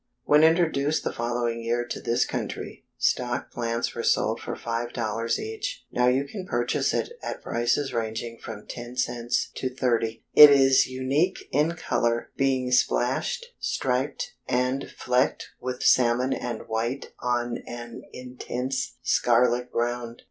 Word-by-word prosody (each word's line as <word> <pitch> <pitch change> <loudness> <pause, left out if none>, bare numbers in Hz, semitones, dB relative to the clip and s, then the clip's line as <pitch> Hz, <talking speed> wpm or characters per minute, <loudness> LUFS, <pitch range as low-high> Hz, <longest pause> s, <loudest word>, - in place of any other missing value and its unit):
When 150 +1 +5
introduced 160 -3 +3
the - - -2
following 120 0 -1
year 120 +1 0
to 120 - -5
this 120 0 +1
country, - - -5
stock 120 -1 0
plants 115 -1 -2
were 120 - -3
sold 110 -1 +1
for - - -4
$5.00 115 -1 -2
each. 445 +3 -5
Now 125 0 +2
you 130 +3 +2
can 185 +5 -7
purchase 120 0 0
it - - -1
at - - -5
prices 120 +4 0
ranging 115 0 -3
from 110 -2 -8
ten 120 0 -8
cents 120 -1 -1
to 130 - -1
thirty. 120 -3 -1
It 150 0 +11
is 135 -2 +5
unique 135 +8 0
in 150 +5 +2
color, 120 -7 -1
being 130 -2 +1
splashed, 475 - +1
striped, - - -1
and 125 +2 0
flecked 125 0 0
with 125 0 -4
salmon 125 +1 +4
and 120 -2 -5
white 115 +5 -2
on 120 -1 -1
an 120 -1 -7
intense 125 +1 -4
scarlet 125 +1 +2
ground. 120 0 -2
125 Hz, 140 wpm, -26 LUFS, 120-135 Hz, -, It